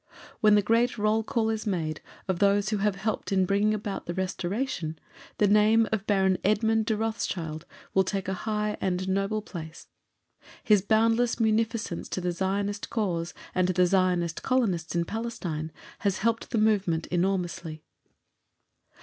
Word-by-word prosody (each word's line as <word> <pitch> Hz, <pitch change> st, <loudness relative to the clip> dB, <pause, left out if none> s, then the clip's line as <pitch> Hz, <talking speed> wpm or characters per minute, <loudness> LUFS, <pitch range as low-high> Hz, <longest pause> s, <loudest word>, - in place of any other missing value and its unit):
When 210 Hz, -1 st, +5 dB
the 205 Hz, -, +4 dB
great 230 Hz, +3 st, +2 dB
roll 215 Hz, +1 st, +2 dB
call 225 Hz, -1 st, 0 dB
is 220 Hz, 0 st, -3 dB
made 160 Hz, -5 st, -2 dB, 0.3 s
of 185 Hz, -3 st, -1 dB
those 200 Hz, 0 st, +3 dB
who 215 Hz, -, 0 dB
have 205 Hz, 0 st, +1 dB
helped 210 Hz, +2 st, -3 dB
in 190 Hz, -1 st, +3 dB
bringing 205 Hz, +3 st, +2 dB
about 205 Hz, -1 st, -5 dB
the 175 Hz, -, -3 dB
Restoration, 185 Hz, -2 st, -2 dB, 0.4 s
the 210 Hz, -, +4 dB
name 215 Hz, +2 st, +5 dB
of 215 Hz, -2 st, -2 dB
Baron 190 Hz, -2 st, +2 dB
Edmund 220 Hz, +2 st, +2 dB
de 220 Hz, -, +1 dB
Rothschild 175 Hz, -8 st, -3 dB, 0.3 s
will 190 Hz, -, +4 dB
take 195 Hz, 0 st, -3 dB
a 190 Hz, -, -1 dB, 0.2 s
high 210 Hz, 0 st, -1 dB
and 180 Hz, -2 st, 0 dB
honourable 195 Hz, +3 st, -1 dB
place. 165 Hz, -5 st, -9 dB, 0.7 s
His 210 Hz, -3 st, +5 dB
boundless 225 Hz, +4 st, +2 dB
munificence 225 Hz, -3 st, 0 dB
to -, -, -2 dB
the 180 Hz, -1 st, -1 dB
Zionist 200 Hz, +3 st, -2 dB
cause 175 Hz, -7 st, -2 dB, 0.2 s
and 185 Hz, 0 st, +2 dB
to 185 Hz, -, +1 dB
the 180 Hz, 0 st, +4 dB
Zionist 180 Hz, -2 st, +1 dB
Colonists 195 Hz, -11 st, 0 dB
in 170 Hz, 0 st, +1 dB
Palestine 175 Hz, -8 st, -4 dB, 0.3 s
has 200 Hz, -2 st, 0 dB
helped 230 Hz, +1 st, 0 dB
the 235 Hz, -, -1 dB
movement 200 Hz, -7 st, +2 dB
enormously. 175 Hz, -3 st, -1 dB
200 Hz, 160 wpm, -27 LUFS, 180-220 Hz, 0.7 s, When